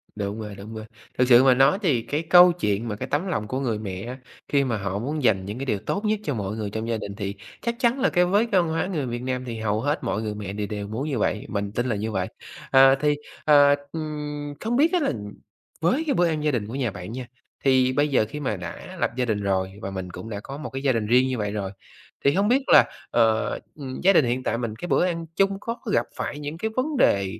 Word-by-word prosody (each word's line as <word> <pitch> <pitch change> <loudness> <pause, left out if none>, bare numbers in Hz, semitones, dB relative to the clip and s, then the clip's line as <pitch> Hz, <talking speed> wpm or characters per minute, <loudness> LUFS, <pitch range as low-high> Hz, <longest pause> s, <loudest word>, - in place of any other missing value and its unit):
Đúng 105 +1 -3
rồi, 105 -2 -6
đúng 105 +3 -9
rồi. 110 0 -6 0.3
Thực 125 - +3
sự 125 0 +7
mà 130 -1 +6
nói 135 +9 +4
thì 140 - +2
cái 150 +6 -2
câu 180 0 +9
chuyện 115 - -1
mà 105 - -3
cái - - -5
tấm 165 +7 -1
lòng 110 - -2
của 130 +3 -2
người 115 -6 -1
mẹ, 105 +5 -5 0.3
khi 140 -1 +2
mà 120 -4 -1
họ 100 0 -3
muốn 145 +4 -3
dành 95 -5 +3
những 105 +4 -5
cái 135 - -3
điều 105 -6 0
tốt 200 - -3
nhất 215 0 +1
cho 145 - -1
mọi 105 0 -3
người 105 -2 -3
trong 110 +2 -4
gia 115 - 0
đình, 100 -2 -6
thì 100 -1 -4 0.3
chắc 235 0 -1
chắn 245 +1 +2
là 270 - +3
cái 180 -1 +3
với 205 +6 +3
cái 195 -5 +3
văn 170 - -2
hóa 160 +2 0
người 155 -8 -2
Việt 120 0 -4
Nam 130 0 -3
thì 115 -2 -5
hầu 110 0 0
hết 145 +2 -1
mọi 110 - -1
người 105 -1 -3
mẹ 100 -2 -5
đều 105 -1 -3
đều 105 -1 -5
muốn 125 +8 -3
như 130 -6 -1
vậy, 105 - 0
mình 100 -1 -2
tin 120 +4 -1
là 115 - 0
như 110 +2 -3
vậy. 95 -3 -1 0.4
Ờ, 135 0 +7
thì, 150 +1 +1 0.3
ờ, 145 -1 +7 0.2
ừm, 150 -2 -5
hông 240 +2 +1
biết 320 +6 +4
á 360 - +4
là 300 - +1 0.7
với 225 - +2
cái 280 - +2
bữa 175 -5 +3
ăn 155 -2 -1
gia 150 - +2
đình 110 -5 -2
của 115 - -6
nhà 125 -6 -1
bạn 90 +3 -8
nha, 125 +1 -5 0.4
thì 130 -1 +4
bây 145 +2 +2
giờ 130 -6 +2
khi 150 - -6
mà 130 -7 -1
đã 85 -1 -8
lập - - +2
gia 125 - +1
đình 105 -3 -1
rồi 95 -1 0
và 95 - -4
mình 95 -1 -5
cũng 115 - -8
đã 100 - -4
có 135 +7 -8
một 150 - -6
cái 135 0 -5
gia 135 - +3
đình 115 -3 0
riêng 125 +3 +4
như 130 -2 -2
vậy 105 -1 -2
rồi, 100 -2 -3 0.5
thì 140 - +5
hông 200 +3 +2
biết 265 +3 +3
là, - - +8 0.3
ờ, 110 -2 +3 0.3
ừm, 135 -3 -7
gia 195 +2 +5
đình 155 -7 +5
hiện 125 +2 -1
tại 115 - 0
mình 115 -3 -3
cái 175 - -6
bữa 175 - +3
ăn 170 -2 -2
chung 195 0 +2
có 230 +2 -4
gặp - - +2
phải 145 - -4
những 150 +2 -5
cái 220 +4 -2
vấn 275 +2 -1
đề, 100 - +2
130 Hz, 275 wpm, -24 LUFS, 105-155 Hz, 0.7 s, câu